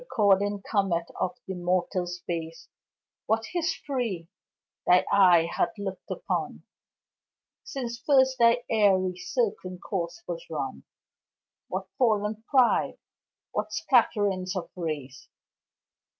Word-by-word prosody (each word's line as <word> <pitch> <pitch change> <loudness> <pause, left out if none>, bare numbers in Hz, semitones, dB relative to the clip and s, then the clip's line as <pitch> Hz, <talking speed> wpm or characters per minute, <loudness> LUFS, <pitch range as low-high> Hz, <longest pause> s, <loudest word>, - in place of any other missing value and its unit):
Recording 205 - +2
comet 190 -5 0
of 185 - -1
th' 245 -5 -24
immortal 180 0 0
space, 170 -2 -5 0.6
What 225 0 +1
history 265 - -2 0.6
thy 180 0 +6
eye 180 -4 +6
hath - - +1
look'd 195 -2 -6
upon - - -3 1.0
Since 245 - -5
first 265 -2 +3
thy 235 +1 +5
airy, 190 -4 +3
circling 185 - -2
course 180 - -4
was - - -4
run! - - -4 0.8
What - - -3
fallen 215 -3 +1
pride! 255 -4 +3 0.5
What - - -3
scatterings 205 -7 +2
of 185 - -4
race! 150 -7 -5
200 Hz, 105 wpm, -27 LUFS, 180-240 Hz, 1.0 s, thy